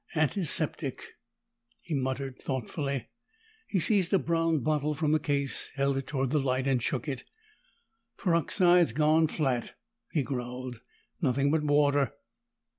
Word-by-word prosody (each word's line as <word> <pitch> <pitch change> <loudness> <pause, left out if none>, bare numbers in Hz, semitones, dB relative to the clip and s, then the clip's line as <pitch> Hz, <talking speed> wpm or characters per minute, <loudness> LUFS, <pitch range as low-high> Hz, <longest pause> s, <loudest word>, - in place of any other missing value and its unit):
"Antiseptic," 160 +2 +1 0.8
he 170 - -7
muttered 130 -1 -2
thoughtfully. 135 - -3 0.6
He 195 - 0
seized 185 +1 +3
a 195 - +5
brown 165 -3 +1
bottle 150 +2 0
from 150 0 0
the 155 - +3
case, 140 -2 -1
held 140 0 +1
it 135 0 -3
toward 135 -3 -1
the 150 - +2
light, 130 -1 0
and 135 -3 +1
shook 130 +5 -2
it. 135 -3 -4 0.9
"Peroxide's 175 - +3
gone 155 +3 +3
flat," 130 -6 -2 0.4
he 150 - +1
growled. 125 -2 -5 0.4
"Nothing 140 -1 +2
but 160 0 +2
water." 145 -3 +2
145 Hz, 130 wpm, -29 LUFS, 130-155 Hz, 0.9 s, a